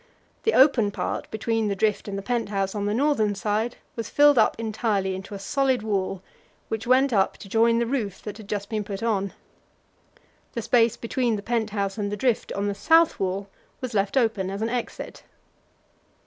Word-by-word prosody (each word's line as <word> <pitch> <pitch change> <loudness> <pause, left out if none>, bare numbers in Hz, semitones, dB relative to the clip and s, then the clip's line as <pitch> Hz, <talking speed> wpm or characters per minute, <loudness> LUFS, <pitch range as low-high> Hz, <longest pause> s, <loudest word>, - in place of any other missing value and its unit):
The 450 - +3
open 260 -6 +5
part 205 - -4
between 225 0 -1
the 200 - 0
drift 210 +2 0
and 200 -1 -4
the 195 - -5
pent 235 -2 -1
house 195 -2 -1
on 205 -1 -2
the 205 - 0
northern 235 -6 +2
side 215 +4 -1 0.2
was 230 -2 -4
filled 290 -3 +5
up 220 - +3
entirely 215 -3 -1
into 195 +2 -7
a - - -4
solid 260 +4 0
wall, 195 -3 -2 0.5
which 220 +1 -3
went 260 +1 +4
up 195 -3 +2
to - - -11
join 230 +3 +3
the 235 - +1
roof 230 -6 -2
that 210 -1 -6
had 215 -3 -11
just 200 -1 -2
been 215 -1 -2
put 200 +1 -6
on. 200 -4 0 1.2
The 235 - -3
space 235 0 +3
between 235 0 0
the 200 - -5
pent 225 -1 0
house 200 0 -2
and 205 -1 -2
the 210 - -3
drift 245 +1 0
on 200 +1 -1
the 200 - 0
south 325 +10 +4
wall 195 +1 -2 0.3
was 255 -2 -5
left 200 +4 +1
open 220 -6 +1
as 200 +2 -3
an 225 - 0
exit. 245 0 -5
215 Hz, 200 wpm, -25 LUFS, 200-235 Hz, 1.2 s, open